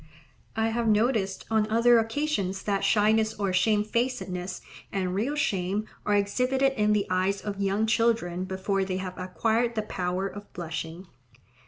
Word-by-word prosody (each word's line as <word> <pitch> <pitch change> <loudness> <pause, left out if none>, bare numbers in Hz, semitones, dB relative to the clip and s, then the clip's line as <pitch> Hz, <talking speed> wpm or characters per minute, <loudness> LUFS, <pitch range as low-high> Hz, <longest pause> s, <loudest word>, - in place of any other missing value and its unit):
I 225 0 +1
have 230 0 -1
noticed 215 -3 +1
on 220 -1 +2
other 235 +1 +5
occasions 225 -5 -1
that 200 -2 0
shyness 215 +2 +3
or 200 -2 -1
shamefacedness 210 -2 0 0.3
and 185 -2 -1
real 235 +10 -1
shame 200 -5 0 0.2
are 210 - +3
exhibited 255 +7 +2
in 210 -4 +2
the 205 -1 +1
eyes 185 +2 +1
of 200 -1 -4
young 200 +2 +1
children 220 -6 +1
before 190 +1 -1
they 185 -1 -2
have 185 -1 -5
acquired 220 +7 0
the 215 - 0
power 185 -2 -2
of 205 +1 -10
blushing. 165 +1 -5
205 Hz, 150 wpm, -27 LUFS, 190-225 Hz, 0.3 s, other